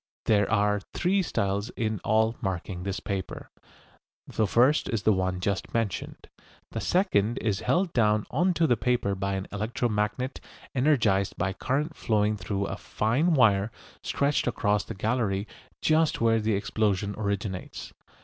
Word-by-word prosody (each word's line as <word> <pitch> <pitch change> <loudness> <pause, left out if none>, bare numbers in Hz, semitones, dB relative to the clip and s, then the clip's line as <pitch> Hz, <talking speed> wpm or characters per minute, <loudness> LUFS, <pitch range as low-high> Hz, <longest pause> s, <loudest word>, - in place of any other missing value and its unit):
There 105 -2 +3
are 105 -2 +2 0.2
three 190 +3 +2
styles 100 - -1
in 110 -3 -1
all 110 +2 +2
marking 95 -1 -3
this 95 +1 -3
paper. 95 -2 -5 0.8
The 110 - 0
first 130 +8 +3
is 110 -3 -1
the 110 - +4
one 95 -1 -1
just 100 +3 -2
mentioned. 115 -5 -3 0.4
The - - -4
second 120 - +1
is 105 -3 -1
held 180 0 +1
down 105 -3 +2
on 175 +6 +2
to 165 - +3
the 125 - +3
paper 115 -2 0
by 100 0 -2
an 95 0 -3
electro 110 +4 -1
magnet 105 +5 -2 0.3
energised 120 -8 +2
by 95 +2 -1
current 145 - -2
flowing 105 -1 +1
through 100 +1 -3
a - - -4
fine 140 +11 +1
wire 105 -5 +4 0.3
stretched 140 -1 0
across 105 -4 +1
the 115 - -7
gallery 105 -1 -1 0.4
just 155 0 +3
where 115 -1 +3
the 110 -1 +1
explosion 100 -1 0
originates. 100 -2 -4
105 Hz, 150 wpm, -27 LUFS, 100-125 Hz, 0.8 s, the